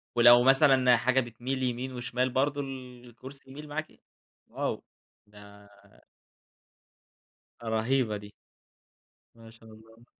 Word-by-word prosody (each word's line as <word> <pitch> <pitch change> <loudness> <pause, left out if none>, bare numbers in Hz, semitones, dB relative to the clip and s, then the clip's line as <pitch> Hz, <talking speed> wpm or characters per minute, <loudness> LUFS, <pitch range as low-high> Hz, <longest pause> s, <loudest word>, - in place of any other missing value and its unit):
ولو 120 0 +7
مثلًا 135 -2 +5
حاجة 130 +3 +1
بتميل 130 +2 -4
يمين 125 +1 -3
وشمال 125 +1 -2
برضه 140 +3 0
الكُرسي 130 0 -11
يميل 150 +3 -10
معاكِ؟ 155 +1 -7 0.5
واو! - - -4 0.4
ده 105 0 -16 1.9
رهيبة 110 0 0
دي. 105 0 -12 1.0
ما 115 -1 -15
شاء 110 0 -17
الله. 115 +2 -18
125 Hz, 100 wpm, -28 LUFS, 115-130 Hz, 1.9 s, ولو